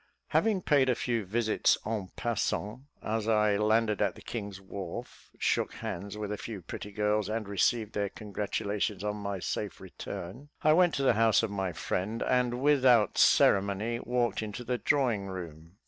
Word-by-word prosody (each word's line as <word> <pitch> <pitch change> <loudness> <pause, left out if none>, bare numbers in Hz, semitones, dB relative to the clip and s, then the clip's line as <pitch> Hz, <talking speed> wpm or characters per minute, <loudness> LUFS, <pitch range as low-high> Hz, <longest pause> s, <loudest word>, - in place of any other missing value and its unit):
Having 210 -5 +2
paid 140 -3 +3
a 125 - +3
few 115 -4 -1
visits 110 +3 +2
en 105 -4 -3
passant, 120 +1 -2 0.2
as 110 0 -2
I 105 -2 +3
landed 110 0 +2
at - - +1
the - - -13
King's 100 -4 -5
Wharf, 95 -2 -8
shook - - 0
hands 100 +4 -5
with 105 -1 -4
a 105 - -4
few 105 -6 -7
pretty 105 - -7
girls, 105 0 0
and 110 -1 -2
received 105 +2 +1
their 100 -1 -1
congratulations 105 0 -3
on 105 0 -2
my 100 -1 -3
safe 100 +3 -4
return, 95 +7 -8
I 155 - +6
went 175 +1 +4
to 140 - -1
the 130 - +5
house 115 0 +4
of 110 - -1
my 95 -2 -2
friend, 95 +7 -2
and, 125 0 +1
without 130 -7 +4
ceremony, 100 +4 +4
walked 120 -1 0
into 110 +2 -5
the 125 0 -2
drawing 120 -9 +1
room. 85 -2 -8
105 Hz, 170 wpm, -30 LUFS, 100-120 Hz, 0.2 s, I